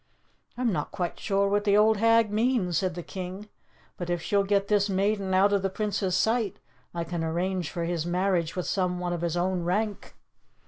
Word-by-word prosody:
"I'm 245 -2 +1
not 150 -3 -2
quite 175 -2 -3
sure 200 -1 +1
what 205 +1 +1
the 205 -1 +3
old 215 +1 +5
hag 230 0 +4
means," 215 -5 +1
said 185 -3 -2
the 175 - -5
king. 190 +4 -7 0.5
"But 175 -1 -5
if 175 -1 0
she'll 200 +4 +1
get 200 0 +1
this 205 -1 +2
maiden 195 0 0
out 195 +2 +4
of 200 - +2
the 195 - 0
Prince's 195 -2 -1
sight, 225 -3 +1 0.3
I 170 -1 -3
can 165 0 -4
arrange 175 +1 -1
for 170 +5 -4
his 170 -1 -1
marriage 175 -1 0
with 180 - -2
some 180 -2 0
one 175 -1 -2
of 170 - -3
his 170 0 -1
own 180 0 0
rank." 205 +4 -2
190 Hz, 200 wpm, -27 LUFS, 175-205 Hz, 0.5 s, old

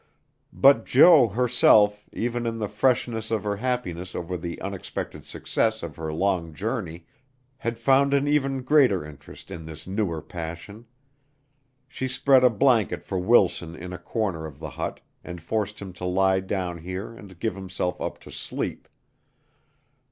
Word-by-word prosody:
But 135 -5 +5
Jo 145 -1 +7
herself, 105 -2 +3
even 120 0 -2
in 115 0 -2
the 105 -2 -2
freshness 120 0 0
of 110 -1 -1
her 105 -1 -2
happiness 100 -7 -3
over 90 +1 -4
the 85 0 -5
unexpected 95 -1 -6
success 110 -2 -1
of 80 -4 -6
her 80 -1 -4
long 85 -1 -1
journey, 95 -6 -4 0.5
had 115 -3 -3
found 135 +4 +3
an 140 +1 +1
even 135 -3 +1
greater 130 - +4
interest 75 +4 -13
in 85 -4 -7
this 80 -1 -9
newer 95 -4 -2
passion. 85 +8 -8 1.0
She 130 - -4
spread 130 0 +4
a 125 - +7
blanket 115 -3 +2
for 95 - -2
Wilson 90 -5 +2
in 90 +2 -8
a 90 - -7
corner 85 -4 -3
of 70 -3 -12
the 75 -1 -7
hut - - -5 0.2
and 90 -1 -7
forced 105 +4 -2
him 95 -2 -8
to 90 - -7
lie 95 +1 +2
down 95 -2 -3
here 95 +6 -6
and 100 -6 -13
give 110 0 -1
himself 95 -1 -4
up - - -3
to - - -13
sleep. - - -5
100 Hz, 160 wpm, -25 LUFS, 90-120 Hz, 1.0 s, Jo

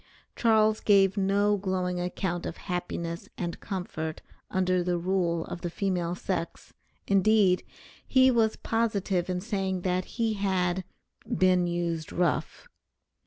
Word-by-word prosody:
Charles 220 -2 +3
gave 195 -2 +4
no 200 +1 +2
glowing 185 -2 -1
account 175 0 -2
of 170 - -6
happiness 170 -2 -4
and 175 -2 -4
comfort 160 -5 -5 0.3
under 185 -1 +1
the 175 0 0
rule 170 -2 0
of 170 - -7
the 175 - -3
female 180 -2 -1
sex, 180 -2 -4 0.3
indeed, 195 -1 +4 0.4
he 260 0 +5
was 225 -3 +2
positive 205 -6 -1
in 180 -1 -1
saying 190 -3 -2
that 185 0 0
he 225 -2 +1
had 190 -3 0 0.5
"been 185 -1 +4
used 170 -2 -2
rough." 175 0 -1
185 Hz, 125 wpm, -28 LUFS, 175-200 Hz, 0.5 s, he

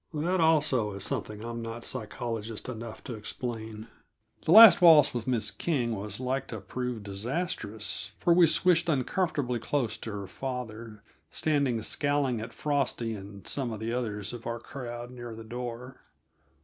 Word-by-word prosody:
That, 170 +4 +1
also, 145 -9 +3
is 100 -1 -4
something 105 +2 -3
I'm 115 0 -5
not 115 +1 -6
psychologist 115 -2 -4
enough 115 -2 -7
to 125 - -6
explain. 110 0 -5 0.6
That - - 0
last 215 -3 +10
waltz 160 -4 +8
with 120 -1 -4
Miss 115 -5 +1
King 125 -9 -1
was 105 +1 -5
like 130 +1 -2
to 110 - -6
prove 125 +2 -4
disastrous, 110 - -3
for 170 - +3
we 170 -1 +6
swished 175 +1 +3
uncomfortably 145 -3 0
close 115 -2 -1
to 110 - -6
her 100 -1 -5
father, 115 -3 -6 0.3
standing 140 -6 +1
scowling 145 -5 0
at 115 - -6
Frosty 135 -6 -1
and 100 -1 -9
some 130 -4 -2
of 110 - -5
the 115 +1 -3
others 105 -4 -2
of 120 -1 -7
our 115 0 -2
crowd 120 -2 -7
near 120 -2 -8
the 115 - -9
door. 120 +2 -7
120 Hz, 160 wpm, -29 LUFS, 110-140 Hz, 0.6 s, last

